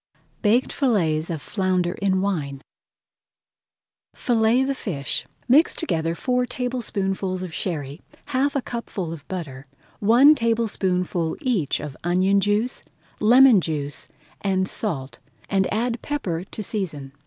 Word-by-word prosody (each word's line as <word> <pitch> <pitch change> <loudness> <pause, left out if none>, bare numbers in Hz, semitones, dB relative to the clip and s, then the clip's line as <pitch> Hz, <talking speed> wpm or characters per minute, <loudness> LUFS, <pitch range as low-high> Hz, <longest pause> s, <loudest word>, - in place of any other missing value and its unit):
BAKED 230 +4 +2
FILLETS 170 - +1
OF 165 -3 -3
FLOUNDER 185 -3 0
IN 190 -1 +2
WINE 150 -8 -2 1.5
Fillet 235 +1 +2
the 275 +1 0
fish. 145 - -3 0.2
Mix 285 +7 +5
together 165 - -1
four 250 +5 0
tablespoonfuls 195 -7 -2
of 180 -3 -6
Sherry, 150 -5 -4 0.2
half 275 +2 0
a 275 - 0
cupful 200 -8 -4
of 155 -3 -11
butter, 150 -8 -6 0.4
one 240 +8 +7
tablespoonful 190 - 0
each 230 - 0
of 145 -3 -6
onion 185 +3 +3
juice, 210 +5 0 0.4
lemon 245 -1 +7
juice, 145 -3 -2
[Page - - -34 0.2
140] 195 -2 0
and 190 - +1
salt, 140 -14 -3 0.3
and 195 -1 +2
add 235 +2 -1
pepper 185 - -3
to 215 - -7
season. 160 -10 -3
195 Hz, 130 wpm, -23 LUFS, 165-235 Hz, 1.5 s, one